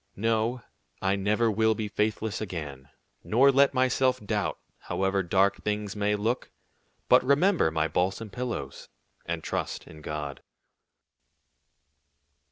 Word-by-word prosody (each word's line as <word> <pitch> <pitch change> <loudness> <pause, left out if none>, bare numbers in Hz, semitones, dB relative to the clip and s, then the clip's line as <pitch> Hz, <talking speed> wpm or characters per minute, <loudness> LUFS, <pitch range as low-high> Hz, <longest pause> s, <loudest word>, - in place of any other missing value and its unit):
No, 115 +3 0 0.4
I 95 +1 +1
never 105 +3 +1
will 110 +1 +2
be 105 0 -3
faithless 105 +1 -1
again, 75 -9 -6 0.3
nor 135 +5 +5
let 140 +1 +5
myself 130 0 +2
doubt, 105 - -2 0.2
however 95 0 0
dark 95 +3 +1
things 105 -1 -2
may 105 0 +1
look, 115 +5 -1 0.6
but - - +6
remember 145 - +3
my 80 0 0
balsam 95 +7 -1
pillows, 115 - -5 0.4
and - - -3
trust - - -3
in 75 - -13
God." 75 -2 -5
105 Hz, 120 wpm, -27 LUFS, 95-115 Hz, 0.6 s, but